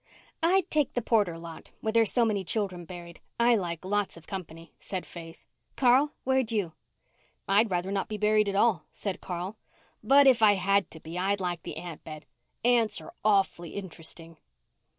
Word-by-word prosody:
"I'd 360 +2 +3
take 300 -3 +2
the 245 - 0
Porter 205 -8 +2
lot 165 -1 -10
where 220 - -1
there's 225 -3 +4
so 240 -2 +3
many 205 -3 0
children 185 -3 -2
buried. 170 -1 -10 0.2
I 235 0 +5
like 175 -4 -3
lots 205 -2 -1
of 165 - -14
company," 165 -3 -8
said 185 -2 -5
Faith. 165 -1 -11 0.3
"Carl, 265 +3 +4
where'd 260 -3 +1
you?" 200 -7 -1 0.7
"I'd 210 +3 +4
rather 180 +1 -1
not 200 -1 -1
be 215 - -3
buried 210 0 +3
at 195 - -3
all," 200 -5 +2
said 195 -3 -5
Carl, 180 +4 -5 0.4
"but 275 +5 +6
if 255 -4 +5
I 210 -2 +7
had 195 +1 +1
to 160 - -9
be 165 +3 -6
I'd 195 +2 +1
like 175 -2 -2
the - - -7
ant 170 -3 -8
bed. 155 -1 -9 0.4
Ants 240 -3 +3
are 340 - -11
awf'ly 195 -5 +1
int'resting." 165 -3 -7
195 Hz, 180 wpm, -28 LUFS, 175-225 Hz, 0.7 s, I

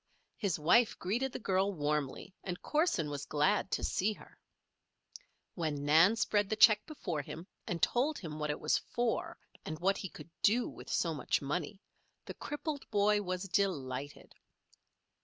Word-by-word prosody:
His 200 -7 -1
wife 180 +10 +4
greeted 240 +9 -1
the - - -4
girl 195 -2 +1
warmly, 150 -1 -2
and 180 -1 -4
Corson 300 - +1
was 145 -1 -5
glad 185 +8 +2
to - - -1
see 205 +3 +1
her. - - -16 1.2
When 150 -5 -2
Nan 165 +8 +6
spread 205 -3 +1
the 215 - +1
check 215 -1 +7
before 175 - -3
him 160 +4 -8 0.2
and 170 -3 -3
told 275 - +2
him 155 -4 -7
what 150 0 -2
it 150 - -2
was 155 - +2
for, 240 -1 -2 0.3
and 155 - -5
what 195 +4 +1
he 190 - -5
could 155 +1 -12
do 235 +4 +3
with - - -10
so 165 -2 +1
much 150 - 0
money, 150 +6 -3 0.5
the - - -6
crippled 295 -1 -5
boy 210 0 +3
was 185 -1 -3
delighted. 145 -9 -2
185 Hz, 160 wpm, -33 LUFS, 150-210 Hz, 1.2 s, check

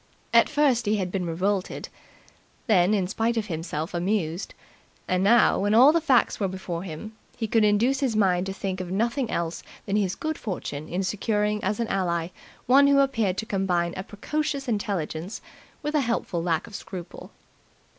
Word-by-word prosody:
At - - +6
first 260 -6 +2
he 210 - +3
had 185 -3 -2
been 180 -2 -2
revolted, 185 +3 -1 0.8
then, 200 -3 +4
in 195 -3 +1
spite 225 +4 -1
of 220 - 0
himself, 165 -3 -4
amused, 175 -1 -2 0.5
and 185 0 +1
now, 230 +4 +5
when 205 +2 +2
all 260 +6 +8
the 335 +1 +2
facts 265 -7 +3
were 200 - +1
before 180 -2 -5
him, 190 +5 -8 0.2
he 235 - -2
could 225 0 +3
induce 225 +6 +3
his 260 -6 0
mind 190 -3 +2
to - - -2
think 190 -1 -3
of 180 - -6
nothing 235 +6 0
else 170 0 -2 0.2
than 200 +1 0
his 195 -3 0
good 315 0 -3
fortune 155 - -5
in 185 +3 -1
securing 210 +2 0
as 205 +3 -1
an 230 - 0
ally 170 -3 0 0.4
one 275 +3 +6
who 280 0 +5
appeared 230 -9 +2
to 220 - -2
combine 180 -5 0
a 190 - -3
precocious 280 +7 -3
intelligence 195 -5 -3 0.4
with 300 +1 -2
a 300 - +3
helpful 230 -8 -1
lack 165 -2 0
of 220 - -14
scruple. 185 -3 -8
200 Hz, 180 wpm, -25 LUFS, 180-230 Hz, 0.8 s, all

